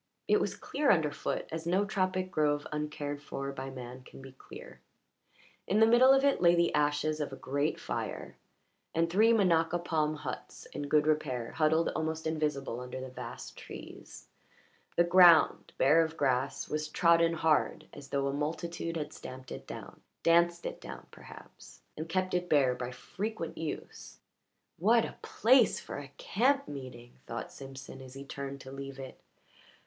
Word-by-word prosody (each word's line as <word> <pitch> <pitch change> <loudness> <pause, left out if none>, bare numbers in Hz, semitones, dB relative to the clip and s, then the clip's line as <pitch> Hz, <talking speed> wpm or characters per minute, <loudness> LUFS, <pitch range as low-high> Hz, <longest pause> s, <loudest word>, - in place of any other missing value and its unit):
It - - +4
was - - -1
clear 290 -1 -1
under 160 -5 +4
foot, - - -3
as 160 +1 -4
no 190 +4 +2
tropic 185 -2 -1
grove 145 -3 +1
uncared 150 -1 -4
for 140 -1 -5
by 135 0 -6
man 125 -1 -8
can - - -14
be 135 0 -11
clear; 65 - -12 0.9
in 205 - +2
the 220 - +8
middle 240 +3 +6
of 270 0 +5
it 280 -9 +2
lay 175 -1 +6
the 170 0 +2
ashes 150 +1 +1
of 145 -2 -3
a - - -6
great 140 +3 -1
fire, - - -5 0.6
and 165 +1 +3
three 220 +5 +5
minaca 175 -6 +3
palm 155 -3 0
huts 150 - -7
in 145 - -4
good 150 0 +3
repair 140 -6 0
huddled 160 +1 +2
almost 160 0 -3
invisible 150 -6 -1
under 125 +1 -6
the 130 0 -6
vast - - -8
trees. - - -11 0.7
The 170 - +5
ground, 175 -2 +6
bare 155 +5 +5
of 160 0 -5
grass, 135 0 0
was 155 0 -2
trodden 170 +1 +4
hard, 160 -2 +1
as 140 - -10
though 140 0 -1
a 140 - -1
multitude 165 +3 -3
had 150 -1 -5
stamped 130 0 -10
it - - -8
down - - -9 0.2
danced 170 +1 +3
it - - -5
down, - - -9
perhaps - - -14
and 160 +2 -6
kept 185 +1 -1
it 180 0 -1
bare 135 -4 +4
by 125 0 -5
frequent 190 - -5
use. 160 -2 -6 0.6
"What 225 +6 +4
a - - -9
place 245 0 +4
for - - -7
a 140 -2 -10
camp 275 +6 +1
meeting!" 125 -4 -9
thought 115 - -5
Simpson 135 0 -10
as 130 0 -11
he 135 +1 -8
turned 140 0 -6
to 130 - -10
leave 135 0 -7
it. 135 -1 -9
155 Hz, 170 wpm, -31 LUFS, 135-170 Hz, 0.9 s, the